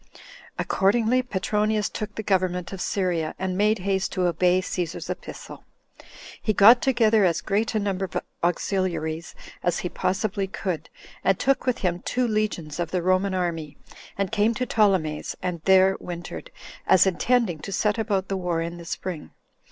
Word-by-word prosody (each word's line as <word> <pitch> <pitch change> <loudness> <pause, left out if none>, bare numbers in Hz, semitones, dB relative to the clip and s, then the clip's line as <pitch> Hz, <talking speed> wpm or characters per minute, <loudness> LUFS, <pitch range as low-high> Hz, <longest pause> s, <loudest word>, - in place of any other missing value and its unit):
Accordingly, 230 +5 +2
Petronius 210 -1 0
took 210 -1 -6
the 220 - -4
government 185 -2 0
of 190 - -5
Syria, 175 -5 -1
and 185 -1 -2
made 210 +3 +3
haste 190 0 -1
to 185 -1 0
obey 180 +1 +3
Cæsar's 180 -3 -3
epistle. - - -8 0.8
He 215 - +1
got 225 +5 +7
together 225 -5 +3
as 175 -3 +2
great 215 +3 -1
a - - +3
number 195 -2 -1
of 185 - -4 0.3
auxiliaries 170 -2 -1 0.3
as 175 -1 0
he - - -1
possibly 195 +2 -1
could, 185 -4 -4 0.3
and 195 - +3
took 270 0 +1
with 250 -1 +2
him 175 -1 0
two 250 +6 -1
legions 210 -8 -2
of 170 -3 -1
the 180 -1 -1
Roman 185 +1 +2
army, 165 -5 -3 0.4
and 195 0 -1
came 225 +1 +2
to 250 - -1
Ptolemais, 190 -10 +1
and 180 -3 -3
there 190 0 +5
wintered, 175 - -7 0.4
as 185 - +6
intending 190 -1 +1
to 195 - -7
set 210 +3 +1
about 200 -4 0
the 195 - -2
war 175 -3 -1
in 170 +1 -4
the 170 - -10
spring. 170 -1 -5
190 Hz, 165 wpm, -25 LUFS, 175-210 Hz, 0.8 s, got